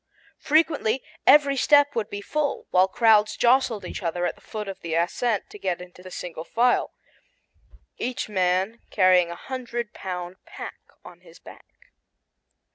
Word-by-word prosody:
Frequently 295 -6 +1 0.2
every 285 -2 +6
step 285 +1 +4
would 225 -3 -2
be 205 - -6
full, 295 +6 -2
while 185 +1 +4
crowds 215 0 +3
jostled 245 -3 +2
each - - -6
other 175 0 -2
at - - -1
the - - -23
foot 210 -1 -6
of 195 - -7
the 165 -1 -4
ascent 200 +6 0
to 210 - -11
get 185 -3 -2
into 180 0 -12
the 185 - -11
single 175 -3 -7
file, 240 +7 +1 1.0
each 250 +1 -3
man 190 +2 0
carrying 185 -3 +4
a 170 - -6
hundred 240 0 -5
pound 180 -1 -6
pack - - -9 0.3
on - - -13
his - - -17
back. - - -17
210 Hz, 155 wpm, -24 LUFS, 180-250 Hz, 1.0 s, every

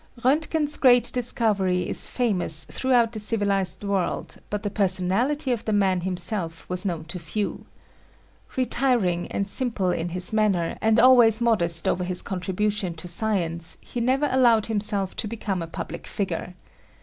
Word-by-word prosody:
J 240 - -1
Roentgen's 300 +1 0
great 245 -2 +4
discovery 210 -7 +1
is - - 0
famous 185 -10 +1
throughout 245 -3 +1
the 220 - -5
civilized 205 -3 0
world 200 -2 -2
but 210 +1 -4
the 205 - -3
personality 205 +9 +1
of 235 -3 -2
the 215 - -1
man 190 -3 +2
himself 175 -2 -1
was 180 0 -2
known 170 -5 -3
to 175 +2 -6
few. 200 +5 -4 0.9
Retiring 240 -9 0
and 200 - -2
simple 210 -5 0
in 170 0 -3
his 180 +3 0
manner 200 -6 +1
and 220 +1 +3
always 240 -3 +6
modest 170 -9 +1
over 180 - 0
his 180 0 0
contribution 190 0 -2
to 160 +2 -8
science 170 -4 -2
he 240 - -6
never 265 +5 +1
allowed 240 -4 +4
himself 205 -3 +1
to - - -1
become 205 -4 -4
a 165 - -5
public - - -7
figure. 180 -2 -4
205 Hz, 155 wpm, -24 LUFS, 180-235 Hz, 0.9 s, always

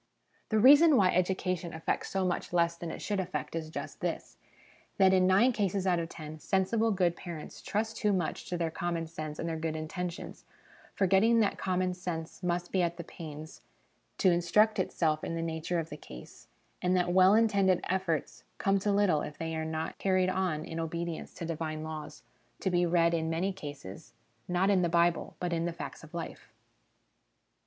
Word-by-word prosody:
The 220 - +2
reason 285 +6 +8
why 185 -3 +5
education 180 -1 0
effects 160 0 -2
so 190 -1 0
much 180 0 -2
less 170 -1 +2
than 170 0 -6
it - - -7
should 205 -2 -1
effect 185 -2 -3
is 160 -1 -4
just - - -6
this - - -4 0.6
that 190 -1 +5
in 185 -1 +4
nine 200 +7 +5
cases 200 -4 -1
out 180 -2 +2
often, 155 -2 -7
sensible 195 +7 +1
good 180 -4 +2
parents 170 -4 -8
trust 220 +2 -2
too 210 - +2
much 180 -5 -2
to 180 - -2
their 165 -1 -1
common 170 0 -2
sense 155 -2 -6
and - - -3
their 165 -1 -3
good 160 -1 -2
intentions, 170 +3 -5 0.5
forgetting 200 +5 +4
that 205 - 0
common 185 -1 0
sense 175 -2 -5
must 175 -1 -1
be 190 - +2
at 170 -1 0
the 170 - -5
pains 155 -1 -9 0.6
to 185 - +4
instruct 195 +5 +3
itself 155 -4 0
in 165 - -3
the 165 - -2
nature 165 +1 -2
of 165 -2 -3
the 150 - -6
case, 65 - -12 0.3
and 180 +1 +2
that 175 -1 +1
well 185 +2 +6
intended 200 -5 +3
efforts 165 -10 -2
come 195 0 +2
to 205 +2 0
little 200 -7 +3
if 150 - -6
they 165 0 -3
are 160 0 -2
not 160 0 -4
carried 185 -1 +2
on 185 -5 -1
in 165 0 -5
obedience 170 +1 -4
to 175 - -5
divine 155 -1 -3
laws, 155 -3 -7 0.4
to 190 - -1
be 175 0 +2
read 170 0 +3
in 160 -1 0
many 180 +4 0
cases, 145 - -9 0.3
not 180 +3 +2
in 190 -2 +4
the 175 - +1
Bible, 170 0 +2
but 175 -1 -2
in 165 0 0
the 175 - -1
facts 165 - -8
of 160 +1 -12
life. 170 - -7
175 Hz, 190 wpm, -30 LUFS, 160-190 Hz, 0.6 s, reason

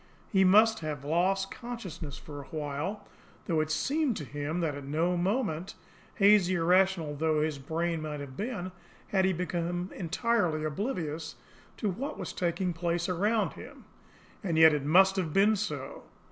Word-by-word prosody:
He 190 -3 +4
must 215 +3 +5
then 155 - -3
have 145 -2 -5
lost 190 +5 +1
consciousness 185 - -7
for 145 -2 -9
a - - -12
while, 155 +7 -4 0.4
though 165 -4 +1
it 155 0 0
seemed 275 - 0
to 150 - -5
him 145 +4 -3
that 160 -3 0
at 140 0 -7
no 160 +6 0
moment, 185 -2 -1 0.4
hazy, 200 -2 +5
irrational 175 -2 +2
though 155 0 +1
his 155 -2 -2
brain 165 +3 -2
might 150 -1 -4
have 140 -2 -8
been, 200 - -4 0.4
had 190 -1 +2
he 190 - +3
become 175 +1 -2
entirely 180 -3 0
oblivious 160 - -3 0.4
to 210 - -1
what 265 +10 -5
was - - -5
taking 180 +1 -1
place 170 +1 -1
around 205 +5 +1
him. - - -12 0.6
And 170 -5 -1
yet 160 -1 +8
it 145 -2 -1
must 190 +5 +5
have 165 -5 -1
been 205 +3 +5
so! 210 +1 -4
175 Hz, 165 wpm, -29 LUFS, 155-195 Hz, 0.6 s, yet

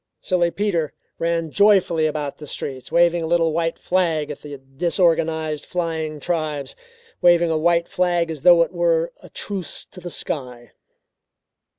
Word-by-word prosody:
Silly 175 -2 +1
Peter 170 -5 -1 0.3
ran 165 -1 -1
joyfully 190 -6 +4
about 150 -2 -4
the 150 - -9
streets 130 -2 -6
waving 170 0 +3
a 160 - -2
little 165 -1 +2
white 165 0 -1
flag 165 -5 0
at 145 - -9
the 145 -1 -8
disorganized 160 +2 0
flying 160 -3 -3
tribes, 155 -5 -3 0.5
waving 175 -1 +4
a - - +1
white 170 +1 +2
flag 175 -2 0
as 155 -4 -6
though 175 +1 +7
it - - -7
were 170 -1 +1
a - - -14
truce 195 -4 -2
to - - -12
the 175 0 -7
sky. 125 -8 -5
165 Hz, 155 wpm, -22 LUFS, 155-175 Hz, 0.5 s, though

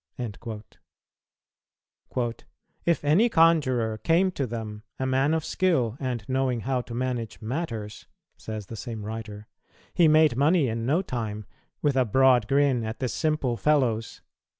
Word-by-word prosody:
"[229:5] 110 +2 -9 0.5
"If 170 -3 +1
any 185 +12 +4
conjurer 130 - +3
came 175 - +2
to 140 -7 -2
them, 110 -2 -6 0.2
a 130 - -2
man 135 +4 +2
of 160 - -2
skill 130 -12 +1
and 125 -6 -3
knowing 130 -2 0
how 130 +2 -1
to 120 -1 -8
manage 125 -2 -3
matters," 115 -4 -5 0.3
says 110 -2 -7
the 115 - -8
same 110 -2 -6
writer, 110 -1 -7 0.5
"he 170 - +5
made 155 -4 +5
money 150 +2 +3
in 115 +1 -3
no 160 +8 +2
time, 110 - -4 0.4
with 145 -2 +2
a 130 - +4
broad 125 -1 +4
grin 135 -3 +2
at 110 0 -4
the 130 - -2
simple 150 -2 0
fellows." 125 -7 +1
125 Hz, 145 wpm, -26 LUFS, 110-145 Hz, 0.5 s, he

